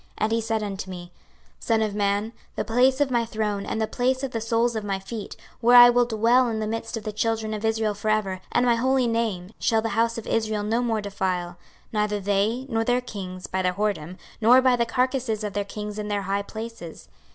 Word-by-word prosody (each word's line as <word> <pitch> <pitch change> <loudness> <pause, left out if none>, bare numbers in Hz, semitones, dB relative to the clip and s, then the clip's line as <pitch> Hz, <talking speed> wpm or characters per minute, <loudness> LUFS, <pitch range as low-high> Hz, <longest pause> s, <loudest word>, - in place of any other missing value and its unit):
26:043:007 - - -32
And 215 - 0
he 230 0 +1
said 220 -1 -1
unto 195 -2 -5
me, 175 -1 -8 0.5
Son 225 -1 +1
of 215 -2 -2
man, 205 +2 0 0.2
the - - -2
place 255 +4 +3
of 285 -2 +1
my 240 -1 +2
throne, 215 -3 -3
and - - -2
the 220 - +2
place 260 +4 -1
of 270 - -2
the 225 - -3
soles 230 +1 +1
of 220 - -2
my 195 -1 -1
feet, 205 +2 -7 0.2
where 245 +1 +6
I 245 0 +10
will 245 0 +3
dwell 235 +2 +3
in 225 -2 -2
the 215 - -2
midst 225 +1 -4
of 220 - -7
the 215 - -3
children 220 0 -1
of 215 0 -5
Israel 220 -1 +1
for 205 +1 -3
ever, 195 -4 0
and 245 - +2
my 240 - +4
holy 260 +1 +2
name, 220 -6 -1
shall 225 -1 +2
the 225 - -1
house 230 +1 +1
of 230 - -6
Israel 215 -2 -1
no 225 +3 0
more 225 -3 0
defile, 185 -3 -2 0.4
neither 210 -1 0
they, 205 +6 0
nor 225 -3 0
their 245 +2 +2
kings, 185 -7 -7
by 190 0 -2
their 180 -1 +1
whoredom, 185 -4 -2 0.2
nor 240 +4 +7
by 255 -1 +4
the 235 -1 0
carcases 250 -2 0
of 205 -2 -3
their 205 - -1
kings 210 +1 -6
in 210 - -4
their 205 -1 -1
high 195 +1 -1
places. 220 -5 -8
220 Hz, 235 wpm, -25 LUFS, 205-235 Hz, 0.5 s, I